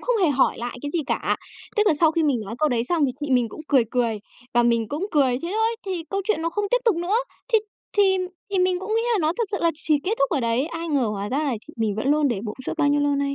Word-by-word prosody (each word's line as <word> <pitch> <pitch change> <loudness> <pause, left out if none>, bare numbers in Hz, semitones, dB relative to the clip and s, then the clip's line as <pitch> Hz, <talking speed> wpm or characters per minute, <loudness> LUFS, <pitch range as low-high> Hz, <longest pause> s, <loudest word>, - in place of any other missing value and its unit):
không - - 0
hề 335 - +5
hỏi 270 -1 +2
lại 240 +1 -5
cái 290 - -3
gì 340 - -1
cả. - - 0 0.4
Tức 425 0 +3
là 330 - +5
sau 320 -2 +5
khi 330 - +1
mình 275 -6 +2
nói 210 +3 -6
câu 305 - +3
đấy 235 -3 +1
xong 330 -4 +2
thì 255 - -2
chị 290 -2 -3
mình 245 -3 +3
cũng 310 - -10
cười 265 -5 +4
cười 230 -4 0 0.3
và 240 - +5
mình 230 -2 +2
cũng 320 +7 -2
cười, 265 -5 +3
thế 340 - -3
thôi! 450 +1 +1
Thì 355 -4 -3
câu 395 0 0
chuyện 430 -7 0
nó 335 - 0
không 415 +4 -1
tiếp - - +4
tục 440 -7 +3
nữa, 355 +6 0 0.4
thì 445 - +7 0.4
thì 385 -2 +5 0.3
thì 390 - 0
mình 365 0 +2
cũng 430 +3 -2
nghĩ 455 - +2
là 430 - +2
nó 310 +1 +2
thật 465 - +2
sự 400 - -1
là 335 - +3
chỉ 305 -1 +1
kết 400 - 0
thúc 275 - +2
ở 285 - +1
đấy. 235 +5 +1
Ai 330 0 -5
ngờ 275 -6 +2
hóa 205 -1 -3
ra 270 - -1
là 280 -6 0
chị 310 - -12
mình 220 -3 0
vẫn 240 +5 -1
luôn 295 -1 +3
để 215 -5 -1
bụng 210 -1 -5
suốt - - -1
bao 290 -2 +3
nhiêu 290 0 +3
lâu 290 -1 +2
nay. 280 0 -1
295 Hz, 305 wpm, -24 LUFS, 245-360 Hz, 0.4 s, thì